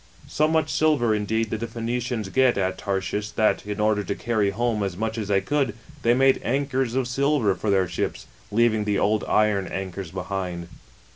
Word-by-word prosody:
41 - - -20
So 155 - +2
much 160 0 +1
silver, 145 -8 +3
indeed, 110 +1 -1
did 110 - -2
the 115 - -3
Phoenicians 115 -2 -3
get 130 +2 +3
at 95 -1 -1
Ta/shish, 100 +1 -2
that, 110 -1 +1
in 105 0 -4
order 105 -1 +2
to 100 - -3
carry 110 -4 0
home 115 +1 -1
as 95 -3 -2
much 110 +1 -2
as 110 -3 -3
they 100 -1 +2
could, 135 0 0 0.3
they 120 -1 +3
made 135 +1 +4
anchors 135 -2 0
of 130 -2 +1
silver 135 -4 +2
for 105 - -3
their 95 -2 +3
ships, 85 - -3 0.2
leaving 110 0 +2
the 105 -1 +1
old 105 +1 +1
iion 105 -3 +2
anchors 95 -1 -5
behind. 90 -2 -4
110 Hz, 195 wpm, -24 LUFS, 100-120 Hz, 0.3 s, made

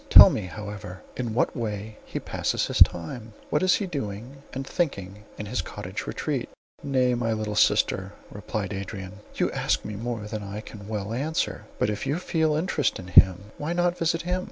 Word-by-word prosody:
Tell - - +11
me, 100 -4 -2
however, 105 -2 -7
in 120 -3 -3
what - - +2
way 105 -2 -4
he - - -4
passes - - -1
his - - -2
time; 110 +7 +3 0.2
what 150 - +2
he 185 +2 +3
is 180 - -9
doing 125 - -5
and 135 +1 -4
thinking 105 - -2
in 105 - -5
his 100 -2 -1
cottage - - -6
retreat?" - - -2 0.3
"Nay, 130 -3 +2
my 120 -2 0
sweet 110 -1 -2
sister," 95 -2 +3 0.2
replied 105 -1 -4
Adrian, 95 0 -6 0.2
"you - - +1
ask - - 0
me 105 - -4
more 115 +1 -3
than 105 0 -4
I 100 +1 -5
can 100 -2 -10
well 105 0 -3
answer; 150 +6 -1
but 105 - +1
if 105 - -4
you 145 - +1
feel 160 -3 +1
interest 155 -2 +1
in 95 0 -9
him, 95 +3 +6
why 150 +3 -1
not 175 0 +2
visit 165 -1 0
him? 180 +1 0
110 Hz, 190 wpm, -26 LUFS, 100-140 Hz, 0.3 s, Tell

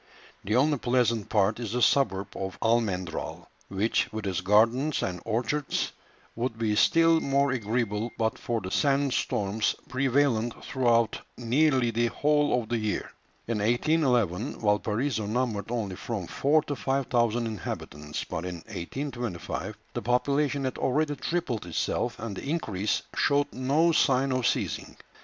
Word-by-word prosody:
The 105 +3 0
only 145 +2 +3
pleasant 120 -4 +1
part 105 +1 +2
is 115 -3 -4
the 125 - 0
suburb 100 -8 +2
of 95 0 -4
Almendral, 105 -7 -1 0.2
which, 100 +4 0
with 110 -1 -5
its 95 -1 -1
gardens 115 +9 +3
and 90 -1 -3
orchards, 120 +6 -1 0.4
would 120 -1 -2
be 110 -2 0
still 165 +7 +5
more 140 -1 +2
agreeable 115 -2 -1
but 110 -1 0
for 115 -2 -2
the 95 0 -6
sand 140 -2 +2
storms 105 +2 0
prevalent 130 -3 +1
throughout 120 -4 +2 0.2
nearly 125 +1 +2
the 120 +1 +1
whole 145 -2 +2
of 110 - -13
the 120 -1 0
year. 110 -1 -2 0.4
In 115 -2 -1
1811, 120 - +1
Valparaiso 110 +2 0
numbered 110 -3 -1
only 105 -6 -3
from 110 -6 -4
four 145 - +2
to 145 -2 -3
five 135 0 -1
thousand 120 -1 +1
inhabitants; 75 -8 -5
but 80 - -5
in 90 -1 -4 0.2
1825 120 -1 -4 0.2
the - - -3
population 140 +3 +1
had 130 - -3
already 145 +3 +1
tripled 130 - -2
itself, 85 - -1
and 115 -4 -5
the 135 - -6
increase 110 - -1
showed 145 0 +2
no 145 +6 +2
sign 135 -3 +3
of 130 -2 +1
ceasing. - - -2
120 Hz, 145 wpm, -27 LUFS, 105-135 Hz, 0.4 s, still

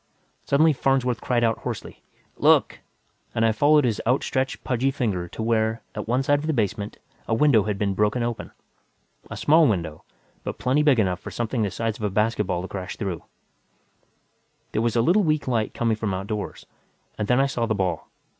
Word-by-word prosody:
Suddenly 155 +3 +4
Farnsworth 130 -3 0
cried 120 -2 +1
out 115 -1 +1
hoarsely, - - -6 0.4
"Look!" - - +3 0.6
and 115 - +2
I 115 - +4
followed 145 +7 +4
his 115 -4 0
outstretched, 130 +1 0
pudgy 130 +1 0
finger 105 -10 -2
to 110 - -6
where, 110 0 0
at 105 - -5
one 125 +4 +1
side 145 +2 +2
of 155 - -5
the 160 - +1
basement, 105 -3 -2 0.3
a 115 - +1
window 115 -6 +4
had 105 -2 -2
been 100 -1 0
broken 105 +4 +1
open 120 -1 -4 0.8
a - - -6
small 160 +1 +5
window, 85 -7 -2 0.4
but - - -5
plenty 130 +4 +1
big 145 -4 +4
enough 90 -4 +1
for - - -8
something 120 0 -2
the 105 - +1
size 110 +3 -3
of - - -9
a 105 - +1
basketball 105 -3 0
to - - -5
crash 95 -2 -6
through 95 -5 -3
it. - - -18 1.5
There 110 - 0
was 115 0 0
a 115 - +3
little 180 - +4
weak 155 -6 0
light 115 -4 -1
coming 115 -2 +1
from 105 -3 -2
outdoors. 100 +2 -5 0.5
And 105 - -1
then 125 +1 +3
I 135 - +4
saw 120 -4 -1
the 110 - 0
ball. 90 -5 -2
115 Hz, 195 wpm, -24 LUFS, 105-130 Hz, 1.5 s, small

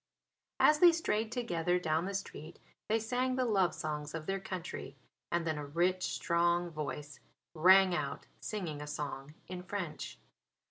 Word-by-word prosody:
As 300 0 +6
they 350 0 +9
strayed 225 -10 -1
together 180 -8 0
down 160 -1 0
the 200 +1 -3
street 165 -5 -6 0.3
they 220 - +3
sang 250 +3 0
the 255 -1 +1
love 195 -7 +2
songs 150 0 -4
of 160 -1 -5
their 195 +2 -1
country 185 -3 -6 0.4
and 170 -1 +1
then 155 -2 -1
a - - -4
rich, 180 +5 +1
strong 170 0 +1
voice 150 -1 -5 0.3
rang 185 +3 +6
out 145 -5 -2
singing 170 -9 -4
a 150 - -6
song 145 0 -5
in 180 -1 -6
French. 185 -3 -5
175 Hz, 155 wpm, -33 LUFS, 155-200 Hz, 0.4 s, they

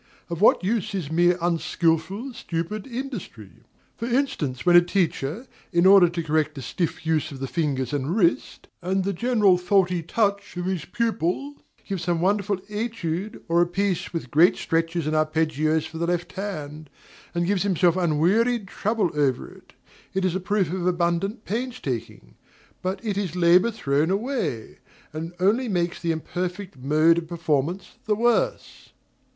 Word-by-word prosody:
Of 170 +1 -4
what 210 - +5
use 210 +1 -1
is 165 -6 -4
mere 175 +2 +3
unskilful, 175 - 0
stupid 170 +4 -4
industry? 235 - -6 0.5
For 230 - -4
instance, 235 - -1
when 175 -1 +5
a 175 - +10
teacher, 175 - -1 0.3
in 170 0 +3
order 190 -2 +8
to 170 -1 -3
correct 155 -1 0
a 135 - -6
stiff 165 +6 -3
use 155 -1 0
of 135 - -8
the 135 - -3
fingers 135 -2 -1
and 145 +5 -1
wrist, 175 -6 0
and 190 +2 0
the 200 +1 -1
general 210 -3 +3
faulty 180 -1 +2
touch 200 +2 -1
of 175 - -3
his 185 -5 -2
pupil, 230 - -1 0.3
gives 190 -4 -4
some 175 -2 +1
wonderful 200 +2 +1
étude 210 -3 -4
or 170 +1 +3
a 175 - +3
piece 190 0 -1
with 160 -8 -5
great 165 +5 +5
stretches 165 0 -1
and 155 +1 0
arpeggios 155 0 +1
for 160 - -8
the 170 - 0
left 175 0 -1
hand, 155 -7 -6 0.5
and 170 0 +1
gives 195 0 +1
himself 180 -3 +2
unwearied 190 +7 +2
trouble 210 -2 -1
over 140 -4 0
it, - - -18 0.4
it 190 -1 +1
is 185 - +1
a 185 - -1
proof 190 -3 0
of 180 -1 -1
abundant 175 +5 0
painstaking; 150 - -4 0.5
but 185 +1 -2
it 205 -2 -1
is 185 -5 -3
labor 180 +4 +5
thrown 150 -8 0
away, 200 - -2 0.3
and 165 +2 -5
only 225 +7 +2
makes 175 -3 -1
the 170 - 0
imperfect 180 +3 -4
mode 155 +5 +3
of 165 - -9
performance 165 +1 -2
the 215 - +1
worse. 240 - -1
175 Hz, 160 wpm, -24 LUFS, 160-200 Hz, 0.5 s, a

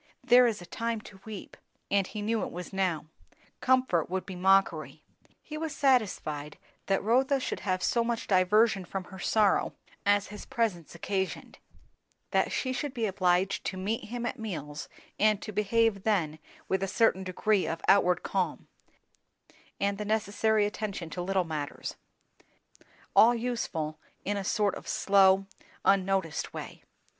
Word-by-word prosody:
"There 250 0 +7
is 215 -6 -2
a - - -10
time 230 +4 -3
to 190 -2 -14
weep"; 215 -3 -8 0.4
and 200 -1 +2
he 210 -1 -5
knew 220 +1 0
it - - -3
was 180 +3 -7
now; 185 -5 0 0.5
comfort 255 -12 +2
would 185 +1 -2
be 190 - -7
mockery. 195 +2 +2 0.4
He 305 0 -7
was 320 -2 -3
satisfied 190 - +1 0.3
that 195 0 +1
Rotha 265 +5 +3
should - - -3
have 185 -1 -1
so 235 - +2
much 230 -1 -2
diversion 195 +2 +3
from 190 +1 -5
her 190 +1 -11
sorrow 210 +1 +2 0.3
as 205 0 +2
his 210 - -8
presence 190 -9 -2
occasioned; 190 +2 -3 0.7
that - - +2
she 260 -1 -1
should 280 +1 -3
be 230 -2 0
obliged 185 -1 +1
to 190 - -3
meet 205 +5 -2
him 240 +1 -4
at 240 - -3
meals, 155 -8 -5 0.3
and 215 -1 +4
to 215 - -5
behave 210 0 +2
then 170 -8 0 0.3
with 190 - 0
a 195 - 0
certain 195 -2 +2
degree 190 +2 +1
of 165 - -3
outward 180 -2 +4
calm, 190 -2 -2 1.1
and 200 0 0
the - - -2
necessary 215 0 +1
attention 205 -5 -4
to 180 - -4
little 190 +1 +1
matters; 155 -3 -5 1.2
all 235 +2 +7
useful 195 -11 -3 0.3
in 205 - 0
a 200 - -2
sort 205 0 +1
of - - -9
slow, 195 -1 +4 0.4
unnoticed 190 -3 +1
way. - - -7
200 Hz, 155 wpm, -29 LUFS, 185-225 Hz, 1.2 s, There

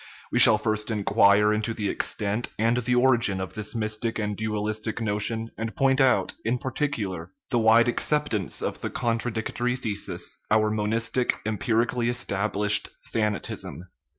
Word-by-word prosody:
We - - +1
shall 110 - +9
first 105 0 -2
in 105 -2 -2
quire 100 +2 +4
into 110 +1 -2
the 105 -2 -2
extent 105 +3 -2
and 115 +2 +2
the 125 0 0
origin 120 -6 +3
of 95 -1 -5
this 105 +2 -6
mystic 110 +1 -2
and 105 -1 -2
dualistic 110 +1 -3
notion, 110 +1 -1
and 115 0 -4
point 135 +1 +3
out, 130 -1 +3
in 115 +3 0
particular, 115 - -3 0.2
the 120 - +2
wide 115 +2 +5
acceptance 120 - -1
of - - -3
the - - -2
contradictory 120 +1 -1
thesis, 110 -5 -5
our 110 0 +3
monistic, 115 +3 0
empirically 115 +3 0
established 105 -3 0 0.2
thanatism. 105 -4 -3
110 Hz, 145 wpm, -25 LUFS, 105-120 Hz, 0.2 s, shall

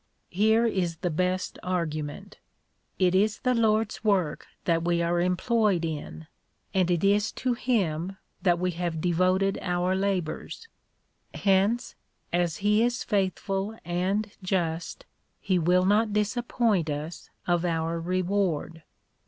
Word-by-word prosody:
Here 220 +5 +3
is 185 -7 0
the 175 +1 -2
best 185 +3 -1
argument. 170 +2 -3 0.6
It 185 -1 +3
is 210 +3 +2
the 255 - +2
Lord's 220 -2 +1
work 190 -8 +1 0.2
that 165 -1 +2
we 170 0 +1
are 175 +1 +1
employed 185 0 +1
in, 145 - -5 0.5
and 185 -2 +2
it 175 -1 +1
is 205 +2 +3
to 255 -1 -1
him 195 -7 -1 0.2
that 175 -3 +3
we 180 +1 0
have 170 -1 -3
devoted 185 +3 +2
our 180 +1 0
labours: 190 - -2 0.7
hence, 200 +4 +2 0.4
as 175 -2 +1
he 210 +1 +4
is 240 +1 +1
faithful 195 +1 -1
and 190 +5 -1
just, 170 -3 -2 0.3
he 185 -2 +1
will 180 +2 +3
not 210 +2 +3
disappoint 210 -4 +1
us 150 +3 -5 0.2
of 175 -1 +1
our 165 -1 -1
reward. 180 -2 -1
185 Hz, 130 wpm, -27 LUFS, 170-205 Hz, 0.7 s, he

